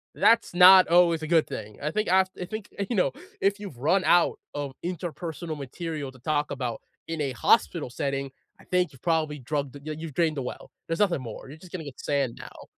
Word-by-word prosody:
"That's 230 -4 +4
not 185 +1 +9
always 170 -1 +4
a 155 - -4
good 165 -1 +4
thing." 105 -1 -7
I 150 - -1
think 215 -3 -1
af 190 0 +5
I 180 - -2
think, 215 +1 -7 0.2
you 235 - -1
know, 180 -8 +2 0.3
if 200 +1 +1
you've 195 -11 -8
run 165 +9 +2
out 175 -1 +4 0.2
of 145 -2 -4
interpersonal 170 -2 -5
material 145 +1 -5
to 130 - -17
talk 150 +3 0
about 125 -4 -4 0.3
in 165 -2 -3
a 135 -2 -1
hospital 120 +2 +2
setting, 140 +1 -2 0.3
I - - -16
think 180 -1 +1
you've 130 - -19
probably 160 -3 +1
drugged 140 +1 -3
the 140 - -11
yeah, 155 +1 -4
you've 160 -3 -7
drained 160 -3 +1
the - - -1
well. 125 - -7 0.2
There's 165 - -2
nothing 180 -9 +2
more. 115 0 -8
You're 145 +4 -10
just 180 -1 -14
gonna 180 -3 -5
get 135 -3 -10
sand 140 -5 -1
now. - - -11
155 Hz, 220 wpm, -26 LUFS, 140-180 Hz, 0.3 s, not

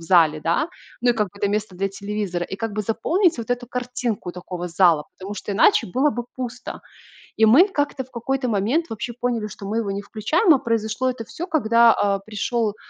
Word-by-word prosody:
зале, 165 -3 +4
да. 170 - +1 0.3
Ну, 245 0 +4
и - - +4
как 210 -4 0
бы - - -30
это 200 - +1
место 205 -2 -2
для 195 +2 0
телевизора, 200 -3 -3
и 190 - -6
как 225 +1 -3
бы 215 - -2
заполнить 315 - +1
вот 230 0 -5
эту 245 0 -2
картинку 245 -7 -3
такого 180 0 -6
зала, 170 -3 +3
потому 195 +2 -7
что 205 +1 -5
иначе 390 - +4
было 265 +10 +2
бы 240 -2 -4
пусто. 250 -1 -6 0.6
И 220 - +5
мы 275 - +7
как-то 290 -7 -2
в 260 - -27
какой-то 255 +2 -2
момент 230 - +1
вообще 225 +2 -4
поняли, 235 -2 -2
что 200 0 -10
мы 220 +3 -1
его 200 -3 -2
не 200 - -3
включаем, 305 - +2
а 270 - +2
произошло 230 +2 0
это 245 -3 -5
всё, 350 +10 -6
когда, 235 -7 +5
а, 200 -1 +1
пришел 215 +1 -2
220 Hz, 210 wpm, -22 LUFS, 200-250 Hz, 0.6 s, мы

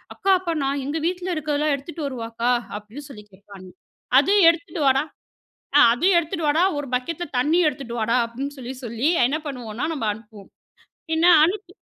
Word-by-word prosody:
அக்கா 390 - 0
அப்ப 340 -3 -3
நான் 275 +1 -1
எங்க 310 +3 -2
வீட்ல 360 0 -3
இருக்கிறதெல்லாம் 300 -1 0
எடுத்துட்டு 300 +2 -7
வரவா 240 -4 -5
அக்கா? 235 +2 0 0.3
அப்டின்னு 225 +8 -11
சொல்லி 210 -6 -11
கேட்பாங்க. 190 -1 -14 0.5
அத 290 - 0 0.2
எடுத்துட்டு 335 -1 -3
வாடா, 270 +2 +3 0.8
ஆ - - +8
அதையும் 355 +9 +2
எடுத்துட்டு 330 -1 -2
வாடா, 315 +4 +2 0.2
ஒரு 290 - -4
பக்கெட்ல 330 +7 -3
தண்ணியும் 310 +6 +3
எடுத்துட்டு 260 -4 -8
வாடா, 230 +2 +1
அப்டின்னு 275 +5 -6
சொல்லி 255 +1 -7
சொல்லி 235 +5 -1 0.2
என்ன 290 +5 -1
பண்ணுவோம்னா 245 -2 -5
நம்ம 245 -8 -3
அனுப்புவோம். 210 -2 -14 0.6
பின்ன 320 +1 +2 0.2
அனுப்பி 365 +2 -1
280 Hz, 165 wpm, -22 LUFS, 235-325 Hz, 0.8 s, ஆ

